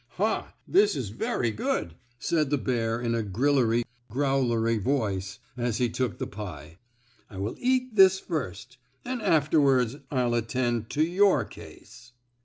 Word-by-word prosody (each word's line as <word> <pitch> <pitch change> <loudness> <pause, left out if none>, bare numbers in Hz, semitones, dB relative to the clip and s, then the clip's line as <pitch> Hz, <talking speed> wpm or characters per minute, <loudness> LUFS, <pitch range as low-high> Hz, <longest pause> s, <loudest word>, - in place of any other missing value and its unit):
"Ha! - - -1
this 405 +3 +4
is 110 - -3
very 115 +2 -1
good," 95 -5 -2 0.2
said 150 +1 0
the 145 - +2
bear 115 -3 -1
in 120 -1 -1
a 115 - 0
grillery, 120 +2 +2 0.3
growlery 120 -3 +1
voice, 100 -6 -1 0.2
as 120 -2 -1
he 125 0 +1
took 125 -1 -2
the - - -3
pie. 85 -5 -8 0.5
"I 100 - -10
will 100 +4 -2
eat 255 -2 0
this 190 -1 +7
first 130 - -5 0.3
and 250 -1 -3
afterward 140 - +2
I'll 125 -3 0
attend 120 -1 -1
to 150 - +1
your 175 - +3
case!" 120 - -14
125 Hz, 145 wpm, -27 LUFS, 115-145 Hz, 0.5 s, this